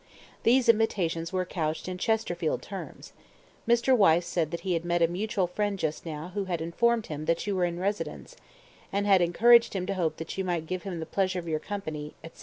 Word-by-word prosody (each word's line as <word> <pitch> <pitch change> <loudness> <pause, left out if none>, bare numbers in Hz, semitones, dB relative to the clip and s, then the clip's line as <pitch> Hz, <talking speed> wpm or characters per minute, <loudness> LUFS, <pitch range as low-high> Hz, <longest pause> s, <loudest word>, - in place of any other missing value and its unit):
These 250 +1 +4
invitations 180 -7 +2
were 185 -1 -1
couched 160 -2 -3
in 180 0 -5
Chesterfield 220 +2 -1
terms: - - -8 0.5
Mr. 235 +2 +4
Wyse 175 -6 +4
said 165 -3 -1
that 170 - -5
he 190 -2 -1
had 165 -1 -1
met 175 0 +1
a - - +5
mutual 200 +3 -1
friend 205 +3 -2
just 160 -1 -3
now 155 +2 -5
who 200 -1 -2
had 175 -3 -2
informed 225 +8 +1
him 150 0 -6
that 165 +1 0
you 205 -1 -1
were 180 -1 +2
in 170 0 -3
residence, 200 - -3 0.6
and 200 +1 0
had 195 -3 +5
encouraged 230 +7 +5
him 185 -1 -1
to 200 - -2
hope 165 -5 -1
that 165 +4 -6
you - - +1
might 175 -3 -2
give 185 +2 -3
him 185 -4 -5
the - - -4
pleasure 185 0 0
of 170 -1 -5
your 155 -1 -1
company, 155 -7 -6
etc. 165 - -12
180 Hz, 215 wpm, -28 LUFS, 165-205 Hz, 0.6 s, a